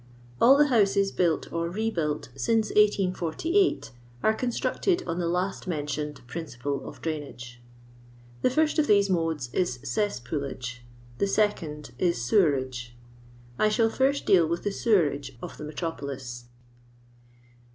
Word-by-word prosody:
All 270 +4 +8
the 295 0 +4
houses 200 -4 +3
built 170 -3 0
or 170 0 -1
rebuilt 175 - -2
since 215 - +1
1848 205 - +2 0.3
are 220 - +4
constructed 255 - 0
on 170 0 -3
the 170 - 0
last 180 +3 -2
mentioned 150 -4 -3
principle 140 -2 -5
of - - -14
drainage. 130 -6 -5 0.8
The - - +3
first 310 +4 +2
of 300 - +3
these 200 -1 +4
modes 160 -8 -1
is 175 -10 0
cesspoolage. 130 - -3 0.4
The 200 - +2
second 175 -8 -1
is 175 -7 +1
sewerage. 130 - +1 0.6
I 215 - +4
shall 225 +1 +3
first 275 +3 +1
deal 175 -4 +5
with 170 +1 -2
the 205 - 0
sewerage 145 - +1
of 130 - -8
the - - -6
me 150 - -6
tropolis. 135 -7 -5
170 Hz, 130 wpm, -27 LUFS, 140-210 Hz, 0.8 s, All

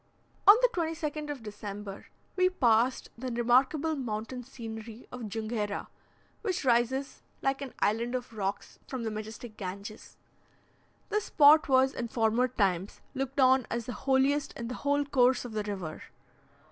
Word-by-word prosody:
On 405 - +12
the - - +6
22nd 315 -5 -3
of 280 -5 -5
December, 205 -1 -7 0.3
we 370 -1 +4
passed 245 -6 +2
the 255 0 -4
remarkable 260 +7 +2
mountain 245 -1 -4
scenery 225 -2 -8
of 245 -4 -6
Junghera, 215 -1 -3 0.5
which 370 -8 -2
rises, 255 +3 +1 0.2
like 270 0 0
an 275 -3 -7
island 235 +4 +1
of 245 -2 -5
rocks, 200 -1 -4
from 260 -3 -4
the 220 - -2
majestic 215 +1 -7
Ganges. 200 +2 -7 0.9
This 425 0 0
spot 300 +1 +6
was, 265 0 +4
in 235 - -3
former 230 +2 +2
times, 195 -6 0
looked 270 +1 -3
on 260 -1 +5
as 235 -1 -2
the 245 - -4
holiest 270 +4 +1
in 235 0 -6
the - - -3
whole 285 0 +1
course 255 -2 +3
of 245 - -6
the 215 -1 -2
river. 190 -6 -5
245 Hz, 150 wpm, -30 LUFS, 220-275 Hz, 0.9 s, On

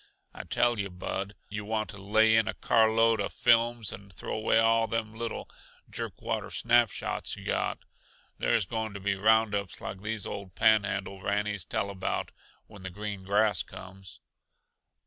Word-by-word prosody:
I - - -8
tell 120 -2 +2
yuh, 100 -1 -2
Bud, 95 +3 -4
yuh 105 0 -5
want 110 -2 -2
to 100 - -11
lay 110 +2 +4
in 110 -1 +3
a - - -2
car 110 -1 +3
load 115 -1 +3
uh 100 - 0
films 115 -2 +3
and 100 0 -11
throw 85 - -5
away 110 +1 +2
all 115 0 +4
them 110 0 -2
little, 115 0 -5 0.4
jerk - - -6
water - - -2
snap 120 -1 +3
shots - - -3
yuh - - -11
got. - - -1 0.5
There's 115 -5 +2
going 110 +1 -3
to - - -5
be 100 +1 0
roundups 105 -1 +2
like 95 - -6
these 110 0 -3
old 95 -2 -7
Panhandle 105 -3 +2
rannies 105 -1 -1
tell 100 - -2
about, 95 -1 -3 0.3
when 100 -3 -14
the 95 - -5
green 100 +1 -6
grass 105 +1 +2
comes." 95 -1 -11
105 Hz, 170 wpm, -29 LUFS, 100-110 Hz, 0.5 s, lay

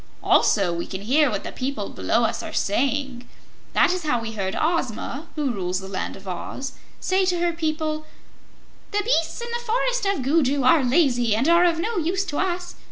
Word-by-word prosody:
Also 195 -5 +3
we 170 0 -4
can 190 - -6
hear 275 +7 +3
what 205 -4 -3
the - - -5
people 255 -5 -3
below 235 - 0
us 225 0 0
are - - -6
saying. 265 +2 -1 0.4
That 360 - +4
is 365 - -2
how 295 -7 0
we 225 -1 -5
heard 195 -2 -3
Ozma, 305 -1 -1
who 295 -4 0
rules 185 -4 -2
the 190 - -8
Land 195 -1 -4
of 195 0 -13
Oz, 225 +9 -5 0.3
say 380 +1 +1
to 360 -1 +1
her 345 0 +1
people: 310 -1 -2 0.8
'The 415 0 0
beasts 360 -6 +1
in 470 - -4
the 475 0 -3
Forest - - 0
of 395 -9 0
Gugu 280 -1 +2
are 275 +3 +5
lazy 245 -5 +3
and 245 +7 +1
are 340 +1 +6
of 335 -2 +2
no 435 +6 -2
use 365 +4 0
to 290 - -3
us. 355 -1 -2
290 Hz, 200 wpm, -23 LUFS, 235-345 Hz, 0.8 s, are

